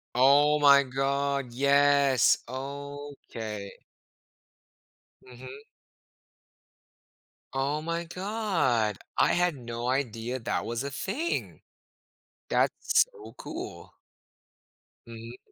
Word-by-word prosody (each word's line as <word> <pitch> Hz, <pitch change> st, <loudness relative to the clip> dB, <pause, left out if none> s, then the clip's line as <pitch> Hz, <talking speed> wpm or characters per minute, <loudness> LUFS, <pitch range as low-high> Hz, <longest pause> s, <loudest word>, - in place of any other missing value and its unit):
Oh 145 Hz, +4 st, +5 dB
my 140 Hz, -1 st, +7 dB
god, 140 Hz, 0 st, -1 dB
yes! 140 Hz, -1 st, +4 dB
Okay. 135 Hz, -6 st, -7 dB, 1.5 s
Mhm. 130 Hz, +1 st, -11 dB, 2.0 s
Oh 140 Hz, +3 st, -1 dB
my 170 Hz, +1 st, -3 dB
god. 170 Hz, -, -1 dB, 0.2 s
I -, -, +4 dB
had 175 Hz, -3 st, +2 dB
no 120 Hz, -1 st, -5 dB
idea 125 Hz, -2 st, -2 dB
that 115 Hz, -, -2 dB
was 120 Hz, +3 st, -3 dB
a 140 Hz, -, -4 dB
thing! 225 Hz, -, -3 dB, 0.9 s
That's -, -, +2 dB
so 430 Hz, -3 st, -13 dB
cool. -, -, -8 dB, 1.1 s
Mhm. 115 Hz, +1 st, -10 dB
140 Hz, 80 wpm, -28 LUFS, 125-145 Hz, 2.0 s, my